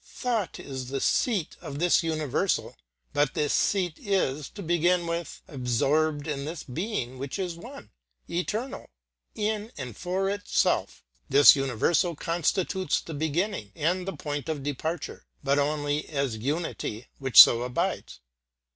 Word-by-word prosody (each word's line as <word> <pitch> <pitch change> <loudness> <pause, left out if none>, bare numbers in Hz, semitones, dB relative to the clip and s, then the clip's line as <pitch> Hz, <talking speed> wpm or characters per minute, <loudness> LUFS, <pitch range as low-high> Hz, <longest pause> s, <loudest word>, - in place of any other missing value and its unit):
Thought 230 -7 -3
is 130 -2 -6
the 135 0 -2
seat 205 - 0
of 145 -5 -6
this 175 +3 +3
universal, 155 -5 -1 0.4
but 145 -2 +1
this 150 -1 +1
seat 180 -5 +1
is, 155 -8 -1
to 200 - -9
begin 175 +1 +2
with, 170 0 -4
absorbed 145 +4 0
in 140 -2 -3
this 160 +3 -5
being 130 - -4
which 135 +5 -4
is 185 -3 -2
one, 210 - -11 0.4
eternal, 215 +9 -3 0.5
in 215 +1 -2
and 125 -6 -6
for 185 - -1
itself. 205 +1 0 0.3
This 140 +3 +8
universal 140 +6 +1
constitutes 175 +2 0
the 165 - -8
beginning 155 - -2
and 180 +4 0
the 195 - -4
point 145 0 -4
of 150 -3 -3
departure, 145 +3 -4 0.2
but 140 +1 +2
only 145 0 -1
as 140 -6 -1
unity 130 -2 -3
which 135 -2 +5
so 115 - +10
abides. 125 - -3
155 Hz, 140 wpm, -27 LUFS, 140-180 Hz, 0.5 s, so